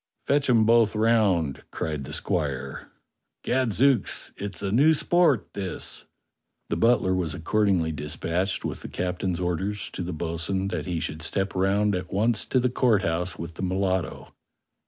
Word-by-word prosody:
"Fetch 140 Hz, -1 st, +2 dB
'em 115 Hz, -3 st, +5 dB
both 115 Hz, -1 st, +4 dB
round," 105 Hz, -, +2 dB
cried 75 Hz, -3 st, -4 dB
the -, -, -8 dB
squire. 70 Hz, -5 st, -2 dB, 0.5 s
"Gad 125 Hz, -2 st, +1 dB
zooks! 130 Hz, +1 st, +1 dB
it's 100 Hz, 0 st, -6 dB
a 100 Hz, -, -1 dB
new 145 Hz, +8 st, +5 dB
sport 145 Hz, -, +2 dB
this." 95 Hz, -3 st, -5 dB, 0.6 s
The -, -, 0 dB
butler 115 Hz, -5 st, +3 dB
was 90 Hz, -4 st, -1 dB
accordingly 95 Hz, -2 st, +1 dB
dispatched 80 Hz, +5 st, -2 dB
with -, -, -4 dB
the -, -, -7 dB
captain's 90 Hz, 0 st, -2 dB
orders 95 Hz, +4 st, -2 dB
to -, -, -5 dB
the 90 Hz, +1 st, -3 dB
bo'sun 85 Hz, +4 st, -2 dB
that -, -, -4 dB
he 85 Hz, -2 st, -1 dB
should 80 Hz, 0 st, -4 dB
step 95 Hz, +4 st, 0 dB
round 100 Hz, +2 st, +2 dB
at 90 Hz, -1 st, -4 dB
once 110 Hz, +4 st, +2 dB
to 130 Hz, -, +2 dB
the 125 Hz, -, +2 dB
Court 115 Hz, -5 st, +2 dB
House 90 Hz, 0 st, -1 dB
with 85 Hz, +1 st, -6 dB
the -, -, -8 dB
mulatto. 95 Hz, -2 st, -2 dB
95 Hz, 160 wpm, -26 LUFS, 85-110 Hz, 0.6 s, em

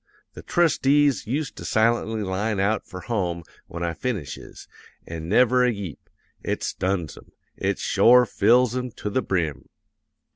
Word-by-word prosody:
The -, -, -10 dB
trustees 145 Hz, -6 st, +2 dB
used 140 Hz, +4 st, -2 dB
to -, -, -8 dB
silently 110 Hz, -1 st, +1 dB
line 100 Hz, +2 st, -2 dB
out 105 Hz, +3 st, 0 dB
for 95 Hz, -, -8 dB
home 90 Hz, -7 st, -2 dB, 0.2 s
when 85 Hz, 0 st, -6 dB
I 85 Hz, -1 st, -1 dB
finishes, 85 Hz, -, -6 dB, 0.4 s
an' 80 Hz, 0 st, -7 dB
never 125 Hz, +4 st, +4 dB
a 125 Hz, -, +3 dB
yeep. 100 Hz, -, -6 dB, 0.4 s
It -, -, -2 dB
stuns 90 Hz, -6 st, -2 dB
'em; -, -, -16 dB, 0.2 s
it -, -, -1 dB
shore 125 Hz, +1 st, +5 dB
fills 120 Hz, +3 st, +3 dB
'em 125 Hz, 0 st, -2 dB
to 105 Hz, -, -5 dB
the 130 Hz, -, +1 dB
brim! 85 Hz, -, -2 dB
110 Hz, 150 wpm, -24 LUFS, 90-125 Hz, 0.4 s, shore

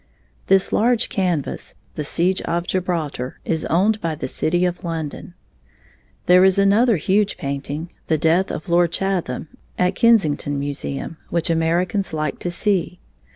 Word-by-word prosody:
This 195 Hz, 0 st, +3 dB
large 235 Hz, +1 st, +2 dB
canvas, 180 Hz, -7 st, -2 dB, 0.2 s
"The 150 Hz, -, -4 dB
Siege 175 Hz, +5 st, +1 dB
of 170 Hz, +1 st, -2 dB
Gibraltar", 165 Hz, -9 st, -3 dB
is 160 Hz, -1 st, -1 dB
owned 210 Hz, +6 st, +2 dB
by 165 Hz, -2 st, -2 dB
the -, -, -4 dB
city 175 Hz, +6 st, +1 dB
of 180 Hz, 0 st, -3 dB
London. 165 Hz, -4 st, -5 dB, 0.9 s
There 180 Hz, +1 st, +6 dB
is 190 Hz, 0 st, +4 dB
another 205 Hz, +3 st, +4 dB
huge 200 Hz, +6 st, +1 dB
painting, 140 Hz, +4 st, -4 dB, 0.2 s
"The 160 Hz, -, +2 dB
Death 165 Hz, +5 st, +2 dB
of -, -, -5 dB
Lord 170 Hz, -1 st, +3 dB
Chatham", 175 Hz, -7 st, -2 dB, 0.3 s
at 180 Hz, 0 st, +2 dB
Kensington 170 Hz, -, +2 dB
Museum, 140 Hz, +2 st, -4 dB
which 170 Hz, -1 st, 0 dB
Americans 175 Hz, +4 st, 0 dB
like 155 Hz, -2 st, -2 dB
to 175 Hz, -, -3 dB
see. 180 Hz, 0 st, 0 dB
175 Hz, 145 wpm, -21 LUFS, 155-190 Hz, 0.9 s, There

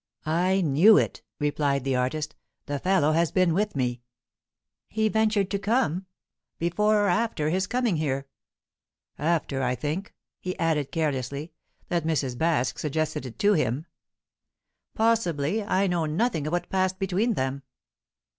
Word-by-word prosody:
"I 180 Hz, +5 st, +2 dB
knew 175 Hz, +7 st, +6 dB
it," -, -, 0 dB, 0.2 s
replied 145 Hz, -2 st, 0 dB
the 135 Hz, -1 st, 0 dB
artist. 150 Hz, +5 st, -1 dB, 0.3 s
"The 145 Hz, 0 st, -3 dB
fellow 180 Hz, -3 st, +2 dB
has 165 Hz, +1 st, +2 dB
been 185 Hz, -3 st, +3 dB
with 210 Hz, +2 st, 0 dB
me." 125 Hz, -2 st, -1 dB, 0.9 s
"He 220 Hz, 0 st, 0 dB
ventured 215 Hz, -3 st, +1 dB
to 200 Hz, -, 0 dB
come? 195 Hz, -, 0 dB, 0.5 s
Before 205 Hz, +5 st, +2 dB
or -, -, +2 dB
after 180 Hz, -6 st, +1 dB
his 185 Hz, +2 st, 0 dB
coming 245 Hz, -6 st, 0 dB
here?" 140 Hz, -3 st, -1 dB, 0.9 s
"After. 150 Hz, -3 st, 0 dB
I 125 Hz, -1 st, +1 dB
think," 150 Hz, -, -4 dB, 0.2 s
he 185 Hz, 0 st, -4 dB
added 155 Hz, -4 st, 0 dB
carelessly, 145 Hz, 0 st, -2 dB, 0.4 s
"that 170 Hz, -2 st, 0 dB
Mrs. 145 Hz, -6 st, -1 dB
Baske 130 Hz, -5 st, 0 dB
suggested 155 Hz, -3 st, -2 dB
it 115 Hz, -, -11 dB
to 205 Hz, +1 st, +4 dB
him." 145 Hz, -, 0 dB, 1.1 s
"Possibly. 215 Hz, -5 st, +1 dB
I 195 Hz, -1 st, +1 dB
know 175 Hz, -4 st, 0 dB
nothing 160 Hz, -2 st, 0 dB
of -, -, -2 dB
what 175 Hz, 0 st, -1 dB
passed 185 Hz, 0 st, +1 dB
between 195 Hz, +5 st, 0 dB
them." 130 Hz, 0 st, -2 dB
165 Hz, 145 wpm, -26 LUFS, 145-195 Hz, 1.1 s, knew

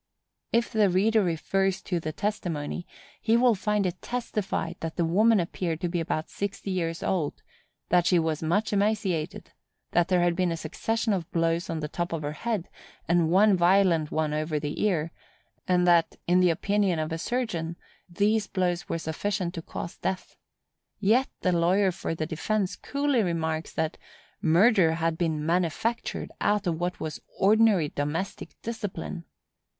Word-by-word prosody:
If 235 Hz, +1 st, +1 dB
the 215 Hz, -3 st, +3 dB
reader 215 Hz, +5 st, +3 dB
refers 190 Hz, +3 st, 0 dB
to 175 Hz, -3 st, -1 dB
the 155 Hz, -1 st, -4 dB
testimony, 175 Hz, -4 st, -3 dB, 0.3 s
he 225 Hz, +1 st, +3 dB
will 245 Hz, 0 st, +5 dB
find 210 Hz, 0 st, 0 dB
it 180 Hz, 0 st, -3 dB
testified 210 Hz, -8 st, -3 dB
that 165 Hz, -1 st, -4 dB
the 170 Hz, -, +1 dB
woman 210 Hz, +6 st, +4 dB
appeared 170 Hz, -1 st, -2 dB
to 175 Hz, -, 0 dB
be 175 Hz, 0 st, -1 dB
about 160 Hz, -1 st, -2 dB
sixty 200 Hz, 0 st, -4 dB
years 165 Hz, -2 st, -2 dB
old; 165 Hz, -6 st, -1 dB, 0.5 s
that 175 Hz, -1 st, +4 dB
she 180 Hz, -, +4 dB
was 160 Hz, -2 st, 0 dB
much 195 Hz, +8 st, 0 dB
emaciated; 200 Hz, -6 st, -1 dB, 0.4 s
that 175 Hz, 0 st, +3 dB
there 180 Hz, -1 st, +3 dB
had 175 Hz, -1 st, +2 dB
been 180 Hz, -1 st, +1 dB
a 165 Hz, -, -2 dB
succession 225 Hz, +8 st, -1 dB
of 175 Hz, -4 st, -3 dB
blows 165 Hz, +1 st, 0 dB
on 160 Hz, -1 st, -2 dB
the 150 Hz, -, -2 dB
top 175 Hz, +3 st, -3 dB
of 160 Hz, -2 st, -3 dB
her 145 Hz, -, -2 dB
head, 210 Hz, +3 st, -3 dB, 0.4 s
and 170 Hz, -1 st, +3 dB
one 195 Hz, +3 st, +5 dB
violent 175 Hz, -3 st, +3 dB
one 155 Hz, -1 st, -1 dB
over 155 Hz, 0 st, -1 dB
the 145 Hz, 0 st, -4 dB
ear; 170 Hz, -6 st, +1 dB, 0.6 s
and 180 Hz, -1 st, +3 dB
that, 170 Hz, -2 st, +4 dB
in 180 Hz, +1 st, +4 dB
the 180 Hz, -1 st, +5 dB
opinion 200 Hz, +1 st, +1 dB
of 155 Hz, +1 st, -2 dB
a 165 Hz, -, -3 dB
surgeon, 175 Hz, -9 st, -2 dB, 0.3 s
these 210 Hz, +4 st, +1 dB
blows 180 Hz, -1 st, -1 dB
were -, -, 0 dB
sufficient 175 Hz, +3 st, -2 dB
to 165 Hz, -, -5 dB
cause 170 Hz, -, -7 dB
death. 185 Hz, -1 st, -3 dB, 0.6 s
Yet 225 Hz, +6 st, +3 dB
the 185 Hz, -, +2 dB
lawyer 180 Hz, +3 st, +3 dB
for 170 Hz, -2 st, -4 dB
the 160 Hz, -, -2 dB
defence 185 Hz, +5 st, -1 dB
coolly 280 Hz, -3 st, 0 dB
remarks 160 Hz, -3 st, -1 dB
that 160 Hz, 0 st, -2 dB, 0.4 s
"murder 180 Hz, 0 st, +5 dB
had 165 Hz, 0 st, 0 dB
been 160 Hz, -3 st, -1 dB
manufactured 180 Hz, +7 st, -1 dB
out 205 Hz, 0 st, +2 dB
of 165 Hz, -2 st, -1 dB
what 175 Hz, +1 st, -2 dB
was 155 Hz, -1 st, -5 dB, 0.2 s
ordinary 205 Hz, -5 st, +4 dB
domestic 150 Hz, +8 st, -4 dB
discipline." 205 Hz, -6 st, -5 dB
175 Hz, 165 wpm, -27 LUFS, 165-205 Hz, 0.6 s, will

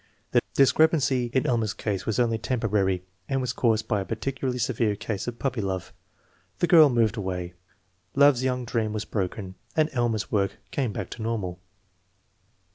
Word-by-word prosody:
The -, -, +4 dB
discrepancy 135 Hz, -3 st, +3 dB
in 130 Hz, 0 st, +1 dB
Elmer's 115 Hz, -4 st, 0 dB
case 100 Hz, -4 st, -3 dB
was 110 Hz, -, 0 dB
only 115 Hz, -2 st, +2 dB
temporary 105 Hz, -7 st, 0 dB, 0.3 s
and 135 Hz, -, +1 dB
was 125 Hz, -1 st, -2 dB
caused 110 Hz, -3 st, +1 dB
by 105 Hz, -3 st, +1 dB
a -, -, -2 dB
particularly 125 Hz, +4 st, -3 dB
severe 115 Hz, -2 st, 0 dB
case 100 Hz, +1 st, -4 dB
of 120 Hz, -1 st, -4 dB
"puppy 130 Hz, -3 st, -1 dB
love." 95 Hz, -2 st, -3 dB, 0.6 s
The -, -, +2 dB
girl 160 Hz, -4 st, +7 dB
moved 115 Hz, -3 st, +2 dB
away, 90 Hz, -3 st, -3 dB, 0.6 s
love's 140 Hz, -2 st, +5 dB
young 125 Hz, -1 st, -1 dB
dream 110 Hz, -2 st, -1 dB
was 110 Hz, 0 st, -3 dB
broken, 95 Hz, -1 st, -3 dB, 0.2 s
and 155 Hz, 0 st, +2 dB
Elmer's 120 Hz, -4 st, 0 dB
work 100 Hz, -2 st, +1 dB, 0.2 s
came 130 Hz, -6 st, -1 dB
back 100 Hz, -2 st, -5 dB
to 120 Hz, -, -7 dB
normal. 105 Hz, -6 st, -3 dB
115 Hz, 165 wpm, -26 LUFS, 105-130 Hz, 0.6 s, girl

